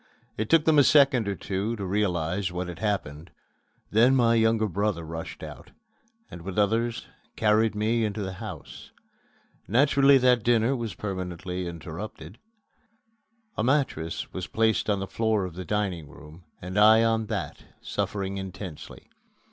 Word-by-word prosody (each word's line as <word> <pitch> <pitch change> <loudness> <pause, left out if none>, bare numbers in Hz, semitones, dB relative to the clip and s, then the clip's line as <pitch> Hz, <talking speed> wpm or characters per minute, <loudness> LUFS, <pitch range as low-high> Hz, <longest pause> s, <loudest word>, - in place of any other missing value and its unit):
It 110 0 -3
took 165 -2 +4
them 155 -2 +5
a - - +7
second 135 -6 +4
or 100 - -1
two 100 +5 -3
to 100 -3 -5
realize 90 -2 -1
what 90 +1 -4
had 85 -2 -8
happened. 90 -7 -3 0.6
Then 120 +5 +5
my 120 -3 +4
younger 110 -1 +2
brother 100 -2 -1
rushed 80 +1 -7
out, - - -10 0.6
and 85 - -9
with 95 +2 -7
others 115 +3 0 0.3
carried 110 0 +2
me 110 +2 +1
into 105 -1 -2
the 95 -1 -4
house. 110 -3 -9 0.8
Naturally 140 +3 +5
that 125 -2 +3
dinner 120 +3 +2
was 115 -7 -4
permanently 90 -2 -5
interrupted. 85 +5 -8 1.2
A - - -1
mattress 125 - -1
was 95 -1 -5
placed 110 -1 +1
on 100 -1 +1
the 95 - -3
floor 110 -1 0
of 90 - -7
the 90 +2 -7
dining 95 -7 -2
room 80 +5 -14 0.2
and 95 +3 -2
I 110 +2 +7
on 110 -1 +1
that, - - -4 0.2
suffering 100 -1 -3
intensely. 95 -4 -8
105 Hz, 150 wpm, -26 LUFS, 90-115 Hz, 1.2 s, a